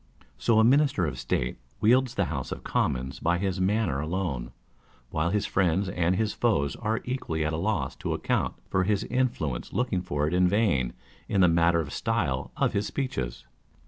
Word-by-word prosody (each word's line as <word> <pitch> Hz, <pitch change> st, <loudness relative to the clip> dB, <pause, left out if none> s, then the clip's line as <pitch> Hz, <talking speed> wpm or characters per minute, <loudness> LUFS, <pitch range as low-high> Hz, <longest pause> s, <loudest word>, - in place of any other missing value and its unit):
So 110 Hz, -, +3 dB
a -, -, +6 dB
Minister 135 Hz, -, +4 dB
of 65 Hz, -5 st, -4 dB
State 60 Hz, 0 st, -1 dB, 0.2 s
wields 125 Hz, +3 st, +3 dB
the 100 Hz, -, +1 dB
House 70 Hz, -6 st, -4 dB
of -, -, -5 dB
Commons 65 Hz, +1 st, -1 dB
by 85 Hz, +1 st, +1 dB
his 95 Hz, 0 st, -1 dB
manner 95 Hz, -7 st, +1 dB
alone; 75 Hz, -7 st, -2 dB, 0.6 s
while 80 Hz, +2 st, 0 dB
his 100 Hz, +2 st, 0 dB
friends 95 Hz, 0 st, +1 dB
and 90 Hz, 0 st, +1 dB
his 110 Hz, +2 st, 0 dB
foes 80 Hz, -13 st, +1 dB
are 110 Hz, 0 st, -1 dB
equally 85 Hz, -12 st, -2 dB
at 80 Hz, -, -1 dB
a -, -, -1 dB
loss 100 Hz, +2 st, -1 dB
to -, -, -2 dB
account -, -, -1 dB
for 95 Hz, -, +1 dB
his 105 Hz, +2 st, +1 dB
influence, 120 Hz, -, -1 dB
looking 115 Hz, -7 st, 0 dB
for 75 Hz, -5 st, -1 dB
it 80 Hz, -, -2 dB
in 90 Hz, 0 st, +4 dB
vain 90 Hz, -, +1 dB, 0.4 s
in 100 Hz, -, +2 dB
the 90 Hz, -, +7 dB
matter 85 Hz, 0 st, +3 dB
or 75 Hz, -, -6 dB
style 95 Hz, -, -1 dB
of -, -, +1 dB
his 100 Hz, +1 st, 0 dB
speeches. 65 Hz, -, -3 dB
90 Hz, 185 wpm, -27 LUFS, 75-110 Hz, 0.6 s, the